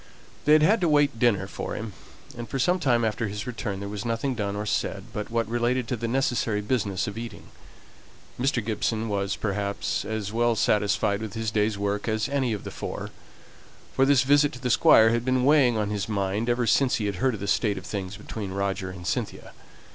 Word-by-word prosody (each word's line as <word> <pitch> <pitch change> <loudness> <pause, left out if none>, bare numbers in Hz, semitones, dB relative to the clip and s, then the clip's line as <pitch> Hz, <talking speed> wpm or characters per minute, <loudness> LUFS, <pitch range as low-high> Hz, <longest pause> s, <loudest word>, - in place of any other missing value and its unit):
They 150 - +6
had 155 0 +6
had 205 +6 +4
to 170 - +2
wait 145 -5 +3
dinner 105 -6 +3
for 100 - -5
him; 110 -1 -6 0.4
and 120 -1 -7
for 135 - -3
some 180 +8 +2
time 120 -7 +2
after 110 +1 -1
his 105 +1 -5
return 115 -5 -4
there 100 - -5
was 100 +1 -5
nothing 120 +3 -1
done 100 -4 -3
or 105 +1 -3
said - - -1
but 105 -1 -4
what 115 -1 0
related 120 +1 0
to 125 - 0
the 115 0 -3
necessary 120 -4 0
business 105 -3 -1
of 105 +2 -5
eating. 115 -1 -8 0.9
Mr. 125 -3 0
Gibson 110 0 -1
was, 100 -1 -1
perhaps, 100 -1 -2
as 110 -1 -4
well 120 0 +2
satisfied 105 -1 +1
with 110 -1 -6
his 110 -1 -2
day's 105 -1 +1
work 100 +1 -2
as 110 -1 0
any 135 -4 0
of 105 -4 -3
the - - -6
four; - - -6 0.8
for 135 - +3
this 140 -3 +5
visit 145 +2 +4
to 125 - -9
the 125 -1 -1
Squire 110 0 +6
had 120 0 0
been 130 0 +1
weighing 135 -5 +4
on 105 -1 -1
his 105 0 -3
mind 100 +2 -1
ever 120 0 +1
since 130 +2 +3
he 105 - -2
had 100 -2 -2
heard 130 +4 +1
of - - -8
the 100 - -4
state 105 -2 +1
of 95 - -7
things 95 +1 -5
between 105 -4 -6
Roger 95 0 -2
and 90 -1 -9
Cynthia. - - -3
110 Hz, 215 wpm, -26 LUFS, 100-125 Hz, 0.9 s, They